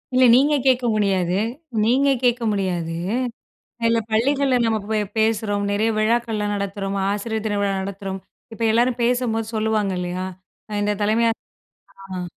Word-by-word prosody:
இல்ல 255 Hz, 0 st, +6 dB
நீங்க 285 Hz, +3 st, +4 dB
கேட்க 255 Hz, -1 st, +3 dB
முடியாது 190 Hz, -4 st, +1 dB, 0.5 s
நீங்க 265 Hz, +5 st, +3 dB, 0.2 s
கேட்க 245 Hz, -1 st, +2 dB
முடியாது. 180 Hz, -5 st, -2 dB, 0.9 s
இல்ல, 230 Hz, 0 st, +3 dB
பள்ளிகள்ல 265 Hz, +3 st, +2 dB
நம்ப 220 Hz, -1 st, +1 dB
போய் 215 Hz, -1 st, +2 dB, 0.2 s
பேசுறோம், 215 Hz, -2 st, +1 dB
நெறைய 215 Hz, +2 st, +1 dB
விழாக்கள்லாம் 215 Hz, -2 st, 0 dB
நடத்துறோம், 200 Hz, 0 st, -3 dB
ஆசிரியர் 220 Hz, +2 st, -2 dB
தின 205 Hz, -1 st, 0 dB
விழா 200 Hz, -1 st, +1 dB
நடத்துறோம். 195 Hz, 0 st, -5 dB, 0.3 s
இப்ப 230 Hz, -, -4 dB
எல்லாரும் 245 Hz, +1 st, +2 dB
பேசும்போது 235 Hz, -2 st, 0 dB
சொல்லுவாங்க 215 Hz, -2 st, 0 dB
இல்லையா? 180 Hz, +1 st, -3 dB, 0.4 s
அ 210 Hz, -, -6 dB
இந்த 210 Hz, 0 st, 0 dB
தலைமை 220 Hz, +3 st, +2 dB
ஆச -, -, -7 dB, 0.7 s
ஆ. 185 Hz, -2 st, -5 dB
215 Hz, 140 wpm, -22 LUFS, 200-235 Hz, 0.9 s, இல்ல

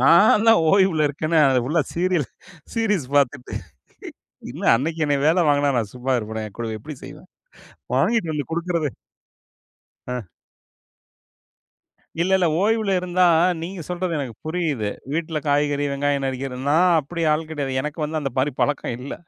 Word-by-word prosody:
நால்லாம் 210 Hz, -, +6 dB
ஓய்வுல 190 Hz, -6 st, +3 dB
இருக்கன்னே 155 Hz, +3 st, 0 dB
அத 130 Hz, -1 st, +3 dB
ஃபுல்லா 155 Hz, +3 st, +1 dB
serial 175 Hz, -4 st, +1 dB, 0.5 s
series 210 Hz, -, 0 dB
பாத்துட்டு. 125 Hz, -3 st, 0 dB, 1.0 s
என்ன -, -, -7 dB
அன்னைக்கு 160 Hz, +5 st, -2 dB
என்னைய 145 Hz, -1 st, +1 dB
வேல 170 Hz, +1 st, +3 dB
வாங்குனா 145 Hz, -1 st, +3 dB
நா -, -, +2 dB
சும்மா 130 Hz, +1 st, -1 dB
இருப்பனா? 110 Hz, 0 st, -5 dB
நா -, -, -19 dB
கூட 115 Hz, -1 st, -3 dB
எப்படி 150 Hz, +3 st, -8 dB
செய்வேன்? 185 Hz, -, -12 dB, 0.7 s
வாங்கிட்டு 220 Hz, -9 st, +1 dB
வந்து 145 Hz, -4 st, -3 dB
குடுக்கறது 170 Hz, -2 st, -1 dB, 1.2 s
அ. 125 Hz, -3 st, -4 dB, 2.0 s
இல்ல, 185 Hz, -, -1 dB
இல்ல 180 Hz, -, +2 dB, 0.2 s
ஓய்வுல 220 Hz, -1 st, +1 dB
இருந்தா, 180 Hz, 0 st, +2 dB, 0.4 s
நீங்க 180 Hz, +1 st, -6 dB
சொல்றது 175 Hz, -2 st, -2 dB
எனக்கு 125 Hz, -5 st, -5 dB
புரியுது. 155 Hz, -11 st, -1 dB, 0.2 s
வீட்டுல 160 Hz, -1 st, -2 dB
காய்கறி, 145 Hz, 0 st, +1 dB
வெங்காயம் 140 Hz, 0 st, 0 dB
நறுக்கிறது 130 Hz, 0 st, -4 dB
நா 155 Hz, -, +4 dB, 0.2 s
அப்படி 165 Hz, +4 st, -5 dB
ஆள் 155 Hz, +1 st, -2 dB
கிடையாது. 140 Hz, -4 st, -3 dB
எனக்கு 150 Hz, +2 st, -5 dB
வந்து 155 Hz, +1 st, -2 dB
அந்த 135 Hz, -2 st, -3 dB
மாரி 140 Hz, +1 st, +1 dB
பழக்கம் 145 Hz, -4 st, -1 dB
இல்ல. 135 Hz, -, -6 dB
150 Hz, 145 wpm, -22 LUFS, 135-175 Hz, 2.0 s, நால்லாம்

